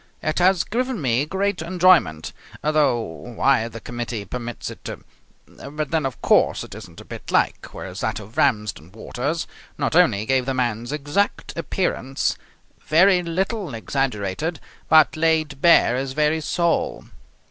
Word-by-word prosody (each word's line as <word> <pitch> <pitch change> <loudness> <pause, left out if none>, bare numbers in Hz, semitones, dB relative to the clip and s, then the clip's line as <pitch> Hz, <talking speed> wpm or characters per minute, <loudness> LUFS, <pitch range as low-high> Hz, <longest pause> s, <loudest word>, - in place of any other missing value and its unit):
It 155 +2 0
has 180 0 +4
given 250 0 -2
me 130 0 +1
great 190 0 -1
enjoyment, 170 - +3 0.3
though 150 -5 +2
why 115 +5 0
the 115 0 -8
committee 120 -3 -5
permits 120 +3 -6
it - - -13
to - - -6 0.4
But 150 +1 -6
then, 160 -4 +1
of 130 - -9
course, - - +3
it - - -10
isn't - - -11
a - - -14
bit - - -9
like, - - +1
whereas 95 0 -8
that 110 - -2
of 105 +2 -12
Ramsden 105 -5 0
Waters 135 +8 -3 0.3
not - - -1
only 115 - +4
gave 130 +1 +1
the 135 - -1
man's 120 -1 -1
exact 150 +7 -1
appearance, 165 -5 -1 0.5
very 180 +5 +4
little 180 - -2
exaggerated, 135 - -2 0.3
but 155 0 +6
laid 155 -3 +1
bare 170 -7 +5
his 130 +1 -3
very 150 +2 +1
soul. 170 +2 0
145 Hz, 145 wpm, -22 LUFS, 120-165 Hz, 0.5 s, but